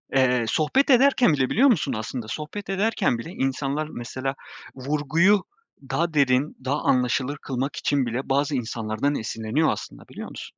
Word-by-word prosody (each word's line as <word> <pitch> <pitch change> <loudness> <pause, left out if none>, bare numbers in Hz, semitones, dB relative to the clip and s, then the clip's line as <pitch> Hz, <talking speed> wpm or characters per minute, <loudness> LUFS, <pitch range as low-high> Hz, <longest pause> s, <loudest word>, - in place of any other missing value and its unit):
eee, 125 -3 +3
sohbet 260 - +2
ederken 255 - +5
bile 130 -2 +1
biliyor 270 +5 +4
musun 145 - +1
aslında, 110 +1 -5
sohbet 155 - -6
ederken 195 - +1
bile 115 - -7
insanlar 140 +1 -2
mesela 130 +3 -4 0.4
vurguyu 150 +9 +2 0.5
daha 170 -1 0
derin, 140 0 +2
daha 140 +3 0
anlaşılır 130 +3 +1
kılmak 135 +1 -3
için 140 -3 0
bile 125 +4 -4
bazı 140 +1 +1
insanlardan 115 +3 -2
esinleniyor 115 +7 -1
aslında, - - -7
biliyor - - -8
musun? - - -10
140 Hz, 150 wpm, -24 LUFS, 125-155 Hz, 0.5 s, ederken